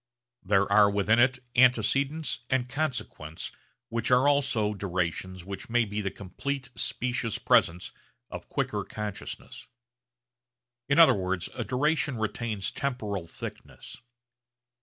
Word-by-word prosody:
There 100 0 +3
are 100 0 +6
within 100 +3 +2
it 125 +1 +4 0.2
antecedents 135 +5 +3
and 130 -1 +1
consequents 125 - -4 0.4
which 115 -1 -1
are 125 +2 +5
also 125 -7 +2
durations 95 -1 -3
which 100 +3 -7
may 120 0 +3
be 105 0 -3
the 100 - -1
complete 130 +8 -5
specious 125 -3 -1
presents 85 +2 +2 0.4
of - - -8
quicker - - -1
consciousnesses. 105 -2 -7 1.2
In 140 - +3
other 165 -6 +8
words 95 -3 -2
a 120 - -3
duration 140 +3 +1
retains 110 -2 -2
temporal 105 -10 -3
thickness. - - -9
110 Hz, 115 wpm, -28 LUFS, 100-130 Hz, 1.2 s, other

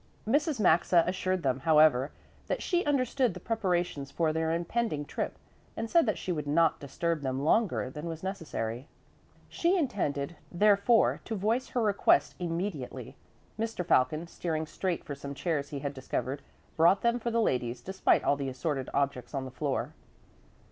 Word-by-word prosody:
Mrs. 290 +2 +1
Maxa 170 -2 +4
assured 185 0 -1
them, 130 -1 +1
however, 150 -3 +4 0.4
that - - -2
she 355 -1 +1
understood 260 -5 +1
the - - -6
preparations 180 - -1
for 155 +2 0
their 160 0 0
impending 170 -1 -1
trip - - -4 0.4
and 225 - -2
said 335 -6 +4
that 215 - +1
she 185 - -3
would 150 -4 -3
not 160 +2 +3
disturb 160 +3 -2
them 135 0 -2
longer 205 - +2
than 150 +4 -6
was 165 0 -6
necessary. 145 - -4 0.6
She 350 +3 +1
intended, 175 - -1 0.2
therefore, 205 +4 +4
to 225 - -3
voice 220 +6 0
her 245 - -1
request 170 -9 +3
immediately. 170 -5 -4 0.4
Mr. 225 -5 -2
Falcon, 155 +6 +2
steering 160 -2 -3
straight 180 +2 -3
for 145 - -6
some 140 0 -7
chairs 145 -3 -2
he 145 - -5
had 140 0 -3
discovered, 135 +1 -3 0.3
brought 170 +5 +4
them 235 +1 +2
for 235 - -2
the 230 0 +1
ladies 125 - 0
despite 190 0 +1
all 145 - +3
the 140 -1 -3
assorted 135 0 -3
objects 140 -2 -1
on 135 -1 -2
the 130 - -7
floor. 140 +1 -2
165 Hz, 165 wpm, -29 LUFS, 140-210 Hz, 0.6 s, Maxa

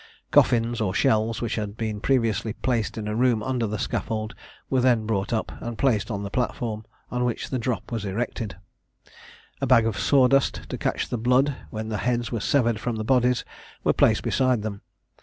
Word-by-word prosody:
Coffins, 115 0 +3
or 95 -3 0
shells, 110 +3 +2
which 115 - -2
had 105 -1 -4
been 110 -2 -3
previously 115 -5 +1
placed 120 -3 -1
in 105 -1 -4
a 105 - -2
room 120 -2 +2
under 125 -2 -1
the 105 +1 -3
scaffold, 110 +2 -2 0.3
were 130 -1 +1
then 120 -3 +3
brought 100 -2 -1
up, 110 -2 -1
and 120 -1 -5
placed 120 -6 +1
on 100 -3 -3
the 100 - -5
platform, 115 -2 -2 0.3
on 125 0 0
which 120 -2 -2
the 130 - 0
drop 120 +1 -3
was 115 -3 -2
erected; 105 -1 -3 1.1
a 135 - 0
bag 120 -3 +5
of 110 -4 -1
sawdust, 135 0 +3
to - - -4
catch - - -1
the 120 - -3
blood 125 +4 +3
when 110 0 -5
the 110 - -2
heads 120 +2 -1
were 115 - -1
severed 120 -1 +2
from 120 +1 -2
the 110 - -3
bodies, 125 0 +2 0.4
was - - +3
placed - - +3
beside 130 -5 +1
them. 100 -2 -5
115 Hz, 195 wpm, -25 LUFS, 110-125 Hz, 1.1 s, bag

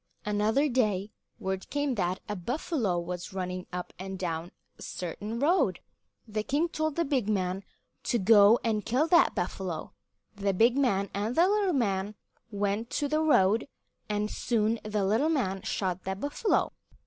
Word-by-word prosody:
Another 210 +7 +2
day 215 -6 0 0.3
word 190 0 -4
came 290 -2 0
that 185 -4 -1
a 210 - -3
buffalo 230 - -1
was 180 +2 -5
running 185 -1 -4
up 180 0 -5
and 190 0 -5
down 170 -1 -3 0.3
a - - -13
certain 205 +6 -5
road. 320 +9 +2 0.5
The 215 0 -2
king 295 +9 0
told 310 -2 -1
the 335 - +1
big 260 -7 0
man 190 -1 0 0.4
to 240 - +2
go 210 +2 +6
and 220 -3 0
kill 255 +7 +2
that 340 0 +5
buffalo. 180 -1 -3 0.4
The 200 -1 0
big 235 +5 +4
man 200 -8 +1
and 210 +5 -2
the 340 +3 +5
little 405 -2 +2
man 205 -5 0 0.3
went 205 +2 -1
to 290 - 0
the 305 +2 +1
road, 225 -8 +3 0.4
and 210 0 -1
soon 225 -1 0
the 210 -2 -1
little 225 +11 +2
man 195 -12 0
shot 185 -2 -2
the 190 0 -2
buffalo. 290 - 0
210 Hz, 160 wpm, -29 LUFS, 190-260 Hz, 0.5 s, go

